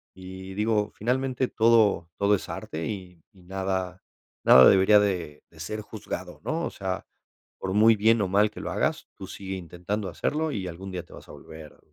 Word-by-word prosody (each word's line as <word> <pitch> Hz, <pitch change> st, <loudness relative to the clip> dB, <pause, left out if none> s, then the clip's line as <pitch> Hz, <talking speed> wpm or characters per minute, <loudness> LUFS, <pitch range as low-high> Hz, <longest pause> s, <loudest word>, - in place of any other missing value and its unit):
Y 95 Hz, 0 st, -9 dB
digo, 105 Hz, 0 st, 0 dB
finalmente, 130 Hz, +3 st, -1 dB
todo, 110 Hz, -7 st, +3 dB
todo 100 Hz, +1 st, +3 dB
es -, -, -7 dB
arte 80 Hz, +1 st, -5 dB
y- 90 Hz, -5 st, -7 dB
y 95 Hz, -2 st, -20 dB
nada- 95 Hz, 0 st, -3 dB, 0.4 s
nada 65 Hz, -, +9 dB
debería 95 Hz, +2 st, +6 dB
de- 90 Hz, -7 st, -2 dB
de 80 Hz, -, -19 dB
ser 105 Hz, +7 st, -5 dB
juzgado, 100 Hz, -4 st, -7 dB
¿no? 165 Hz, +2 st, -2 dB
O -, -, -2 dB
sea, 95 Hz, -1 st, -4 dB, 0.5 s
por 95 Hz, 0 st, -3 dB
muy 110 Hz, +2 st, +6 dB
bien 110 Hz, +2 st, +3 dB
o 100 Hz, -, +1 dB
mal 100 Hz, +3 st, +3 dB
que -, -, -9 dB
lo -, -, -4 dB
hagas, -, -, -1 dB
tú -, -, -9 dB
sigue 95 Hz, -1 st, -6 dB
intentando 90 Hz, +3 st, -4 dB
hacerlo 155 Hz, -, -2 dB
y 100 Hz, -8 st, -4 dB
algún 90 Hz, +3 st, -8 dB
día 90 Hz, -2 st, -5 dB
te -, -, -18 dB
vas -, -, -13 dB
a -, -, -10 dB
volver 80 Hz, -1 st, -12 dB
95 Hz, 190 wpm, -26 LUFS, 90-105 Hz, 0.5 s, nada